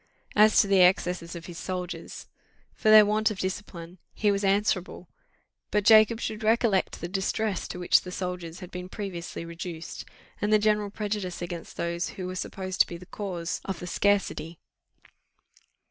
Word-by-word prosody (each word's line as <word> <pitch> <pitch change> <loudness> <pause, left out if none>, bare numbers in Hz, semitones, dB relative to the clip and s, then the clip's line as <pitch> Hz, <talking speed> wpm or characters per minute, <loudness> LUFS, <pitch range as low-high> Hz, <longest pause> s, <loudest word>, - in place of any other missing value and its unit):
As 215 +1 +6
to 205 - +4
the 195 -1 +4
excesses 180 -1 +2
of 170 0 -8
his 175 -1 -8
soldiers, 180 -1 -5 0.5
for 215 - 0
their 215 -1 +9
want 215 +1 +2
of 215 - -5
discipline 185 -2 -5 0.2
he 210 -2 +2
was 200 0 -1
answerable; 195 -3 0 0.6
but 210 -1 +1
Jacob 220 +1 +6
should 215 -1 -4
recollect 220 -3 +1
the 170 - -3
distress 195 +2 -1
to - - -6
which 175 -1 +4
the 180 - -8
soldiers 180 -2 -5
had 180 - -9
been 180 0 -7
previously 180 -5 -6
reduced, 170 0 -7 0.4
and 210 - 0
the 215 - +7
general 210 -1 +1
prejudice 205 -3 -4
against 175 -1 -7
those 170 0 -2
who 185 - -4
were 185 - -4
supposed 185 0 -2
to - - +4
be 170 - -7
the 180 - -13
cause 180 -4 -4
of 190 -2 -4
the - - -6
scarcity. 180 -3 0
185 Hz, 170 wpm, -27 LUFS, 175-210 Hz, 0.6 s, their